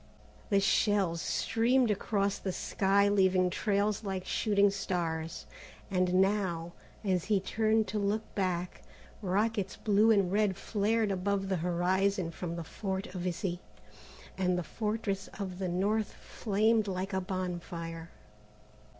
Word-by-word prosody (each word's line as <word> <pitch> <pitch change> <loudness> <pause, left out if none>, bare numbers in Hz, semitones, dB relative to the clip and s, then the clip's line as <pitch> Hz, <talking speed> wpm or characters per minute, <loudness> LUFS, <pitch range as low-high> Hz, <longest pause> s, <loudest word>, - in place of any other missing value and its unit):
The 200 - +4
shells 195 -3 +2
streamed 240 +1 +2
across 200 -1 0
the 190 - -2
sky 200 +2 +2
leaving 190 -2 +3
trails 205 +2 0
like 190 -2 -3
shooting 205 -1 +3
stars, 165 -4 -3 0.5
and 185 -1 +2
now, 185 -3 +1 0.3
as 185 -4 0
he 210 -2 +2
turned 220 +2 +1
to 210 - -1
look 205 +2 0
back, 180 -2 -2 0.4
rockets 205 +1 0
blue 210 +1 +3
and 200 -5 +4
red 205 -2 +2
flared 215 +1 0
above 195 +1 -1
the 190 - +1
horizon 180 +2 +1
from 170 0 -5
the 170 - -4
Fort 190 +2 -4
of 180 -1 -3
Issy, 180 0 -2 0.8
and 180 -1 +2
the 180 - -1
Fortress 210 +3 -3
of 190 -3 -5
the 185 -2 -1
North 205 +5 0
flamed 215 +1 +1
like 190 +1 -3
a 190 - 0
bonfire. 175 -3 -5
195 Hz, 135 wpm, -31 LUFS, 180-205 Hz, 0.8 s, The